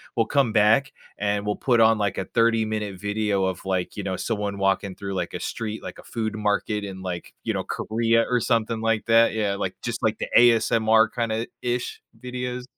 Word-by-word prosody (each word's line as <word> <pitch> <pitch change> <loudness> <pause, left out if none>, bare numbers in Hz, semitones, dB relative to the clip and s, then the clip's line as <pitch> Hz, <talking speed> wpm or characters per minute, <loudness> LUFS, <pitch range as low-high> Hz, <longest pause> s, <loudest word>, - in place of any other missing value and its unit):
We'll 115 - +2
come 135 -5 +2
back, 115 +6 +4 0.2
and 105 0 -1
we'll 105 0 0
put 120 -3 +2
on, 110 0 +5
like, 100 -2 -1
a - - -1
thirty-minute 110 -3 0
video 105 -1 0
of, 95 -2 -3
like, 95 0 -2
you 100 - -3
know, 95 -1 -2
someone 105 0 -3
walking 95 0 0
through, 100 -1 -5
like, 90 -2 -3
a - - -4
street, 110 -1 -4
like - - -8
a - - -12
food 110 -2 -3
market 105 0 -1
in, 95 -1 -7
like, 90 -2 -6
you - - -1
know, - - -2
Korea, 115 +1 +1
or 125 -1 +2
something 115 0 0
like 115 -1 0
that. 115 0 +5
Yeah, 105 -3 0
like, - - -3
just - - -3
like - - +1
the - - -2
ASMR, 115 -2 +5
kinda-ish 120 +1 -3 0.2
videos. 125 0 -5
110 Hz, 195 wpm, -24 LUFS, 100-115 Hz, 0.2 s, on